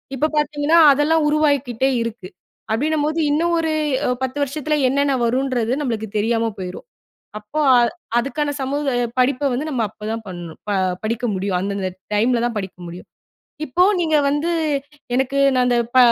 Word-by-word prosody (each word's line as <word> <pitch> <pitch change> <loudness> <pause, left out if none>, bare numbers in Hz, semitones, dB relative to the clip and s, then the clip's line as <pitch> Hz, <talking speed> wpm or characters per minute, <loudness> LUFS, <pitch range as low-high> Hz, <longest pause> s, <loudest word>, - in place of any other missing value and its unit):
இப்ப 295 +4 +1
பார்த்தீங்கன்னா 295 +2 +2
அதெல்லாம் 300 +3 +2
உருவாக்கிட்டே 285 -4 +1
இருக்கு. 230 -5 -5 0.4
அப்பிடின்னம்போது 305 +5 0
இன்னும் 335 +3 +1
ஒரு 320 -1 0 0.5
10 260 +2 -3
வருஷத்தில 300 +2 -2
என்னென்ன 280 +1 +1
வருன்றது 250 -1 0
நம்மளுக்கு 225 -5 -2
தெரியாம 225 +1 +1
போயிரும். 180 - -7 0.5
அப்போ 215 +9 -5 0.6
அதுக்கான 290 +4 -2
சமூக 285 +2 -2 0.3
படிப்ப 275 +2 +2
வந்து 280 +6 -2
நம்ம 255 -5 -1
அப்பதான் 220 +2 -6
பணணும். 175 -3 -8
ப - - 0 0.3
படிக்க 230 +3 -2
முடியும். 190 -1 -1
அந்தந்த 195 0 -2 0.3
டைம்ல 235 +3 +2
தான் 240 - -2
படிக்க 190 -2 -7
முடியும். 175 +2 -10 0.6
இப்போ 345 +6 +2 0.2
நீங்க 315 -3 +2
வந்து 295 +4 0 0.6
எனக்கு 265 +2 0
நான் 250 -1 +2
அந்த 245 -1 +2 0.2
ப - - +6
260 Hz, 140 wpm, -20 LUFS, 225-295 Hz, 0.6 s, ப